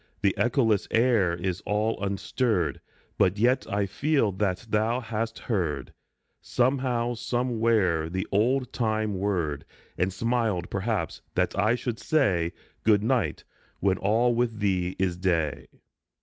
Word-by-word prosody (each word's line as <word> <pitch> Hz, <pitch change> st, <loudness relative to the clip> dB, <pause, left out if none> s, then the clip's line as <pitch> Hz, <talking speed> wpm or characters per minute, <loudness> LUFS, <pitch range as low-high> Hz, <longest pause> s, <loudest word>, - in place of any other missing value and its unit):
The 100 Hz, -2 st, +4 dB
echoless 115 Hz, -4 st, +2 dB
air 115 Hz, -7 st, +3 dB
is 90 Hz, +1 st, -3 dB
all 105 Hz, 0 st, -1 dB
unstirred, 100 Hz, -, 0 dB, 0.4 s
But 95 Hz, +3 st, +3 dB
yet 125 Hz, +5 st, +2 dB
I 100 Hz, 0 st, +1 dB
feel 135 Hz, +2 st, +1 dB
that 95 Hz, +1 st, -1 dB
thou 110 Hz, +3 st, +1 dB
hast 115 Hz, -1 st, -3 dB
heard, 90 Hz, -10 st, -2 dB, 0.5 s
Somehow, 125 Hz, -2 st, 0 dB
somewhere, 115 Hz, -9 st, +1 dB
the 95 Hz, +2 st, -2 dB
old 125 Hz, +5 st, +1 dB
time 110 Hz, -3 st, 0 dB
word, 85 Hz, -8 st, -1 dB, 0.4 s
And 90 Hz, +2 st, +1 dB
smiled, 110 Hz, -3 st, -1 dB
perhaps, 105 Hz, +2 st, -2 dB
that -, -, +1 dB
I 110 Hz, +3 st, +3 dB
should 120 Hz, -1 st, -4 dB
say 90 Hz, -, +1 dB, 0.2 s
" -, -, -36 dB
Good 105 Hz, -2 st, +4 dB
night," 125 Hz, -1 st, 0 dB, 0.4 s
when 95 Hz, -1 st, +1 dB
all 115 Hz, +5 st, +2 dB
with 115 Hz, -2 st, 0 dB
thee 95 Hz, -3 st, 0 dB
is 95 Hz, -2 st, 0 dB
Day. 85 Hz, -5 st, 0 dB
105 Hz, 135 wpm, -27 LUFS, 95-120 Hz, 0.5 s, The